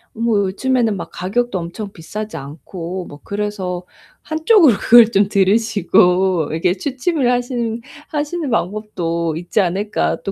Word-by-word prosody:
어 - - -12
뭐 230 -2 +2
요즘에는 230 +3 0
막 185 - -6
가격도 220 +4 -1
엄청 185 +5 -6
비싸지 210 +3 -7
않고 165 +6 -7
뭐 145 - -11
그래서 200 -3 -3 0.4
한쪽으로 315 - +4
그걸 230 -1 +7
좀 200 -1 +3
들으시고 190 -4 +2
이렇게 165 +3 +1
취침을 270 - -1
하시는 240 -2 -1 0.3
하시는 300 +1 -2
방법도 180 -7 -2
있지 175 +5 -2
않을까 195 +4 -1
또 195 - -3
205 Hz, 310 characters per minute, -18 LUFS, 180-240 Hz, 0.4 s, 그걸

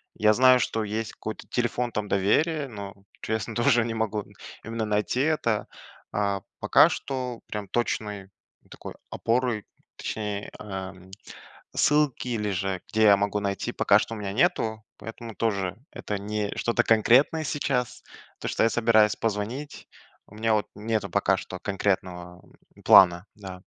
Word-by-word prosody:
Я 105 0 +4
знаю, 130 +2 +6
что 115 -2 -1
есть 110 +1 -3
какой-то 110 - -7
телефон 120 0 -1
там 105 -1 -3
доверия, 145 - +1
но 100 -5 -8 0.3
честно, 110 0 -3
тоже, 120 -1 +3
не 115 - -3
могу, 110 -2 -2 0.4
именно, 115 0 -3
найти 105 +4 0
это. 135 -8 0 0.4
А 100 -1 -1 0.2
пока - - +6
что, 125 -3 -4
прям 105 -1 -5
точной 105 -3 -2 0.4
такой - - -9 0.2
опорой, 115 -3 0 0.3
точней, 105 -2 -4
а, 95 -3 -5
м, 95 0 -17 0.7
ссылки, 150 -4 +2
или 105 -4 -1
же 95 0 -2
где 110 - +1
я 100 -2 +7
могу 100 +1 -1
найти, 100 -1 -2
пока - - +4
что 115 - -4
у - - -7
меня 100 -2 -4
нету, 110 - +1
поэтому 115 0 -9
тоже 100 -5 -1 0.2
это 105 - -4
не 105 0 -3
что-то 120 - +1
конкретное 125 +8 +4
сейчас. 135 -4 -2 0.4
То, - - -3
что - - +1
я 115 - +3
собираюсь 110 -2 +4
позвонить, 115 +7 -4 0.4
у - - -17
меня 110 +1 +1
вот 105 - 0
нету 110 0 -2
пока - - +2
что 95 - -7
конкретного, 90 -3 -2 0.3
э, - - -16
плана. 85 0 +7
Да. 95 -3 -9
110 Hz, 150 wpm, -26 LUFS, 100-120 Hz, 0.7 s, я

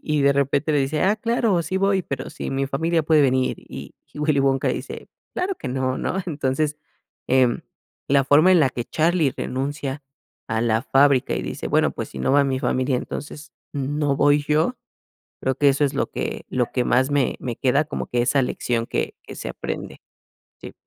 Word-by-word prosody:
y 150 -2 +1
de 140 - +5
repente 140 +2 +1
le 145 - +3
dice: 145 +3 0
"Ah, 205 +3 +3
claro, 225 -5 +1
sí 185 - -3
voy, 195 -1 +2
pero 140 - -5
si - - -6
mi 135 0 -1
familia 160 +4 0
puede 155 -1 +4
venir", 130 -1 +1
y - - -10 0.2
Willy 150 -1 +1
Wonka 135 -1 +2
dice: - - -5 0.3
"Claro 370 +1 -1
que - - -6
no", 130 0 -1
¿no? - - -2
Entonces, 145 -1 -1 0.5
eh, 130 -1 +5 0.6
la 140 -1 +4
forma 155 +7 +5
en 175 - +5
la 135 - +4
que 120 -1 -4
Charlie 160 -2 +1
renuncia 140 +1 -3 0.5
a 110 0 0
la 115 -1 +1
fábrica 135 -1 +3
y - - -2
dice: - - -5
"Bueno, - - +2
pues, - - -6
si 65 - -8
no 65 - 0
va 145 0 +5
mi 135 -1 0
familia, 130 0 0
entonces, 150 +4 -7 0.2
no 145 0 -1
voy 145 0 +3
yo". 155 +11 +1 0.6
Creo 130 0 -1
que 145 0 +4
eso 140 +2 +2
es 140 - 0
lo - - -1
que - - -4
lo 125 -2 -1
que 125 -2 0
más 130 +3 +2
me 140 -3 +1 0.2
queda, 135 +4 +3
como - - -5
que, 120 0 0
esa 135 +3 +2
lección 120 -2 -1
que - - -2
que - - -10
se - - -5
aprende. - - -6 0.6
Sí. - - -9
140 Hz, 195 wpm, -23 LUFS, 130-155 Hz, 0.6 s, de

